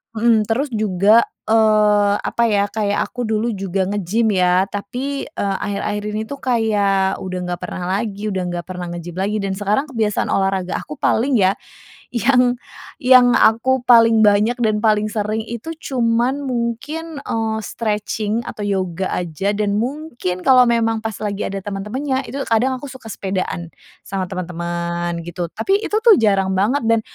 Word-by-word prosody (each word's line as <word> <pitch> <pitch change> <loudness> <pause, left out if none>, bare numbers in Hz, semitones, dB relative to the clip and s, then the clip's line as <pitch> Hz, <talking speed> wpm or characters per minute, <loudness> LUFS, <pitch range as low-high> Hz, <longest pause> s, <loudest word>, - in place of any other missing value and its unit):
mhm, 225 -1 +3
terus 260 +6 0
juga, 210 +2 +4 0.3
eee, 210 -2 +4
apa 235 - -1
ya, 200 -1 +2
kayak 205 -1 0
aku 245 - -4
dulu 220 +1 0
juga 190 0 -1
nge-gym, 205 +3 0
ya. 180 +1 +3
Tapi, 250 +8 -4
eee, 200 -9 -2
akhir-akhir 205 0 -2
ini 215 +1 -2
itu 280 - -5
kayak, 205 -6 +1
udah 185 -1 -4
nggak 175 0 -4
pernah 180 - -5 0.2
lagi, 215 -1 -4
udah 190 -1 -2
nggak 175 -1 -4
pernah 180 -1 -5
nge-gym 175 0 -7
lagi, 210 +2 0
dan 195 -1 -1
sekarang 210 +9 0
kebiasaan 220 -5 -1
olahraga 195 -2 0
aku 150 - -8
paling 255 +3 +2
ya, 190 0 +3 0.6
yang 250 0 +3 0.4
yang 250 -1 +6
aku 250 +3 +3
paling 230 -2 +6
banyak 210 +3 +3
dan 210 -1 +1
paling 215 -1 +3
sering 215 0 -2
itu, 235 +8 -6 0.2
cuman 240 +3 +1
mungkin, 275 +6 -3
eee, 220 -1 -2
stretching 215 0 -2
atau 210 - -6
yoga 190 -2 -1
aja, 180 +4 -2
dan 205 -1 0
mungkin, 240 - -3
kalau 255 -2 +7
memang 225 -1 +1
pas 220 -2 -3
lagi 205 -1 -3
ada 195 0 -4
teman-temannya, 255 +8 -3
itu 275 +4 -5
kadang 250 +4 +2
aku 285 - -7
suka 260 -4 -11
sepedaan, 185 -3 -3 0.4
sama 190 -1 -2
teman-teman, 170 -1 -3
gitu. 175 0 -4
Tapi, 390 - +1
itu 425 - -1
tuh, 450 -4 +7
jarang 195 -3 +2
banget 225 +10 +2
dan 230 0 +4
215 Hz, 160 wpm, -19 LUFS, 195-235 Hz, 0.6 s, kalau